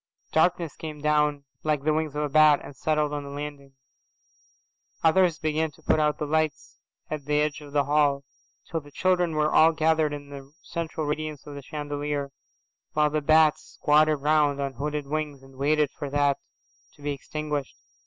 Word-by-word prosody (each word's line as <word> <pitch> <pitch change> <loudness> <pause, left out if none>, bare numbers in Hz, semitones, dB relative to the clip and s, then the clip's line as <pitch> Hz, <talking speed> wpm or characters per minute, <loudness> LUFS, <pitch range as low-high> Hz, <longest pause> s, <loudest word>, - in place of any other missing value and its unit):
Darkness 165 0 +2
came 155 -2 -7
down 150 -1 +1 0.2
like 150 -3 0
the 155 +1 +2
wings 155 -2 -1
of 150 - 0
a 150 - -1
bat 155 0 +6
and 145 - -10
settled 150 +1 0
on 145 -1 -3
the 140 - -8
landing. 140 -1 -7 1.3
Others 170 0 +4
began 155 0 0
to 155 +2 -21
put 155 - +2
out 150 -1 +2
the 150 - -2
lights 155 0 -1 0.3
at 150 -2 -4
the 150 0 +1
edge 150 0 -1
of 145 -1 -11
the 145 0 +2
hall, 145 -1 +2 0.4
till 165 - -2
the 145 - -15
children 180 +2 +1
were 155 0 +1
all 160 +1 +6
gathered 160 -1 +2
in 145 -1 -7
the 140 -1 -10
central 160 -2 -4
radiance 150 0 -3
of 145 - -8
the 140 - -7
chandelier, 145 0 -4 0.6
while 150 -1 +2
the 155 0 0
bats 155 0 +3
squatted 155 +1 +4
round 150 -1 +2
on 140 -1 -2
hooded 145 +3 -3
wings 145 -2 -3
and 135 0 -16
waited 145 +1 +2
for 145 -3 -6
that, 145 0 +2 0.5
too, - - -27
to - - -20
be 145 - -1
extinguished. 150 0 -4
150 Hz, 185 wpm, -26 LUFS, 145-155 Hz, 1.3 s, bat